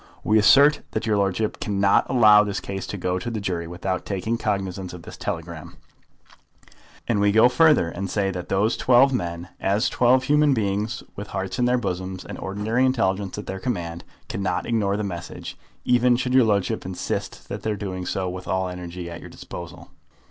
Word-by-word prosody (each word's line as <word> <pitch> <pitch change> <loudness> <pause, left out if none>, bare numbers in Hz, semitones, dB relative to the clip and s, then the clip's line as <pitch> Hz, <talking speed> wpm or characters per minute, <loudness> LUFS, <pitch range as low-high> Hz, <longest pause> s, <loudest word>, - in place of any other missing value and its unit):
We 110 +1 +4
assert 140 +7 +6
that 110 - -2
your 110 -2 +2
ludship 100 +1 0
cannot 100 -1 +2
allow 105 -5 +6
the 100 -1 -4
case 95 -1 -5
to 100 - -5
go 90 0 -1
to 95 - -4
the 115 -2 -3
jury 90 -4 -3
without 90 +2 -3
taking 100 +4 -2
cognisance 95 -5 -3
of 90 -2 -10
this - - -10
telegram; 80 -1 -6 1.3
and 115 -4 +1
we 100 0 +4
go 110 +3 +6
further, 150 - +4
and 95 +3 -5
say 100 0 0
that 90 -1 -6
those 105 +4 +2
twelve 130 +2 +5
men, 85 -5 -3
as 100 +2 +1
twelve 125 +1 +3
human 150 0 +3
beings 105 0 -2
with 105 +1 -6
hearts 95 +4 -4
in 125 - +3
their 125 +1 +3
bosoms 95 -4 -4
and - - -8
ordinary 105 +6 -1
intelligence 105 -7 0
at 105 - -6
their 95 - -5
command, 85 -7 -4 0.2
cannot 95 -2 -2
ignore 105 -4 0
the 105 - -2
message, 85 -3 -6 0.3
even 125 0 +4
should 125 +1 -1
your 130 -2 +6
ludship 100 -3 0
insist 95 -1 -4
upon - - -6
their 110 -1 -2
doing 95 -3 -5
so 95 -1 -2
with 90 0 -6
all 95 0 0
the 90 - -4
energy 90 0 -7
at 85 0 -7
your - - -10
disposal." - - -10
100 Hz, 190 wpm, -23 LUFS, 90-115 Hz, 1.3 s, assert